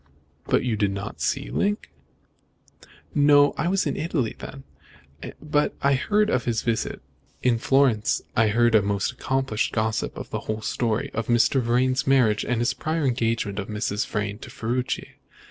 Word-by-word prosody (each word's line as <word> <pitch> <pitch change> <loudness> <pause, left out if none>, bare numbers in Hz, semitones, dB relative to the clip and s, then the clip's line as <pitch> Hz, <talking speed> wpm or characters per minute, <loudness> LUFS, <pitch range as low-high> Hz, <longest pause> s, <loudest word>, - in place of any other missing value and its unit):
"But - - +2
you 120 -4 -1
did 100 -1 +2
not 100 0 -6
see - - -1
Link?" 205 +1 -1 1.2
"No. 145 0 +5
I 155 - -1
was 195 +1 +1
in 145 - -1
Italy 155 -8 -2
then, 135 0 -9 0.8
but 150 -1 0
I 140 0 +3
heard 210 +10 +1
of 130 - 0
his 115 -2 -1
visit. 115 - -2 0.4
In 120 -2 +2
Florence 130 -5 +2
I 110 0 +4
heard 120 +2 +3
from 110 -3 +5
a - - -3
most 100 +4 0
accomplished 130 -3 -1
gossip 110 0 -1
the - - -5
whole 110 0 -4
story 120 +4 -1
of 115 -1 -3
Mr. 120 +3 +3
Vrain's 130 +3 +1
marriage 125 -6 +3
and 125 -1 -1
the 120 - 0
prior 160 -1 -1
engagement 115 -5 0
of 95 - -4
Mrs. 105 +2 -2
Vrain 105 0 -3
to - - -10
Ferruci. 125 +3 -3
120 Hz, 165 wpm, -24 LUFS, 110-135 Hz, 1.2 s, No